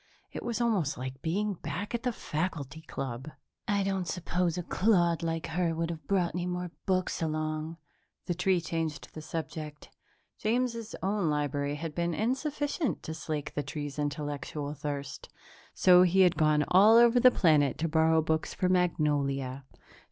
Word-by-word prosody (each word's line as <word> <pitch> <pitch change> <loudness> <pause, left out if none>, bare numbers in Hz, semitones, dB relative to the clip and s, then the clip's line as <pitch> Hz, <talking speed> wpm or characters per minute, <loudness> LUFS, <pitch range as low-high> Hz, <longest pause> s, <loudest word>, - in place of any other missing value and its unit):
It - - -6
was 235 -2 -3
almost 210 - +1
like 130 +1 -6
being 205 +6 -1
back 170 +5 -5
at 235 - -1
the 250 0 0
faculty 155 - -4
club. 135 -3 -5 0.4
"I 200 -1 +1
don't 190 -2 -1
suppose 175 0 -1
a 180 - -2
clod 175 -4 +2
like 165 -1 -2
her 165 0 -1
would 165 +1 -1
have 160 -2 -8
brought 185 -4 +1
any 180 0 -2
more 180 -1 -3 0.2
books 185 -2 0
along," 155 0 -2 0.5
the 175 - -1
tree 180 +1 +2
changed 165 -2 -3
the 155 - -7
subject. 155 -1 -6 0.5
James's 230 0 -1
own 195 -3 +1
library 145 -1 -1
had 160 +1 -5
been 170 0 -1
insufficient 285 +5 -1
to 160 - -5
slake 155 -2 -4
the 145 - -1
tree's 145 0 -5
intellectual 145 0 -3
thirst, 145 -1 -5 0.5
so 180 -1 +7
he 185 +1 +4
had 180 -2 +5
gone 155 -2 +3
all 210 +5 +7
over 235 +1 +6
the 255 - +8
planet 155 - +3
to 165 - -1
borrow 160 0 +3
books 160 0 -1
for 185 - +1
Magnolia. 140 -7 0
Dr. - - -26
165 Hz, 165 wpm, -29 LUFS, 150-185 Hz, 0.5 s, the